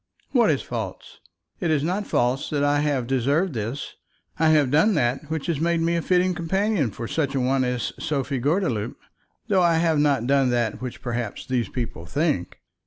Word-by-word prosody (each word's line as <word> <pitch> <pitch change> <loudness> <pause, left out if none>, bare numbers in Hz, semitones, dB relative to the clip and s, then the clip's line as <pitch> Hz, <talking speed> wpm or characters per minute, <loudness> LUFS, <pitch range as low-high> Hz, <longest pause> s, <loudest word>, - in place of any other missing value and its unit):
"What - - +4
is - - +1
false? - - -6 0.4
It 175 -6 -1
is 150 -3 +2
not 185 +6 -1
false 125 +3 0
that 145 -2 0
I 145 0 +3
have 145 -4 0
deserved 140 +8 +1
this. 115 +5 -4 0.5
I 160 0 +4
have 150 -4 +4
done 175 +8 +4
that 130 +5 0
which 160 -2 -3
has 165 -5 -1
made 170 0 +2
me 165 +1 +1
a 170 - 0
fitting 180 +1 +2
companion 185 - 0
for 115 +3 -6
such 140 -1 -1
a - - +1
one 130 +1 +2
as 125 -1 -2
Sophie 140 -2 -2
Gordeloup, 140 - 0 0.5
though 195 -3 +3
I 170 -1 +4
have 165 -2 +2
not 140 -5 +2
done 135 0 +3
that 120 -3 0
which 125 -1 -6
perhaps 120 -4 -3
these 125 -3 -1
people 115 -9 -5
think." 145 - -1
145 Hz, 190 wpm, -24 LUFS, 125-165 Hz, 0.5 s, What